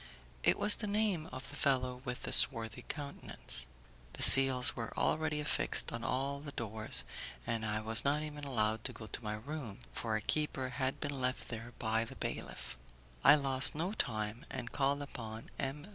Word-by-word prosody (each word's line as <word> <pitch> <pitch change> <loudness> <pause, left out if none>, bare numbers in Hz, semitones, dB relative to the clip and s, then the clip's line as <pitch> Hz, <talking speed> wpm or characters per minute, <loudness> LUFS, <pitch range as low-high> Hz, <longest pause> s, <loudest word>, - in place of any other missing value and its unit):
It - - +3
was 205 +1 +6
the 210 - -5
name 200 -6 -1
of 130 0 -9
the - - -10
fellow 130 -3 0
with 125 -2 -5
the - - -2
swarthy 115 -2 +6
countenance. 140 - -3 0.5
The - - -3
seals 130 -2 +8
were 115 -1 -7
already 155 -1 0
affixed 150 - +1
on 115 0 -6
all 135 +3 -2
the 145 0 -10
doors, 110 -1 -2 0.4
and 115 -1 -3
I 105 0 -2
was 110 +1 +2
not 145 +2 +1
even 150 -1 -8
allowed 110 -5 -1
to - - -1
go 110 - -10
to 115 - -7
my 105 0 -3
room, 120 -2 -7
for 110 -2 -3
a 110 - -2
keeper 140 -3 -2
had 130 +1 -3
been 145 -3 -4
left 130 +1 -2
there 115 +1 -8
by 110 0 -1
the 115 - -9
bailiff. - - -6 0.4
I - - +8
lost 135 -2 +3
no 175 +6 -2
time, 110 - -3
and 125 -2 -6
called 140 +1 0
upon 115 -5 -9
M. 140 +3 -4
130 Hz, 185 wpm, -33 LUFS, 115-145 Hz, 0.5 s, seals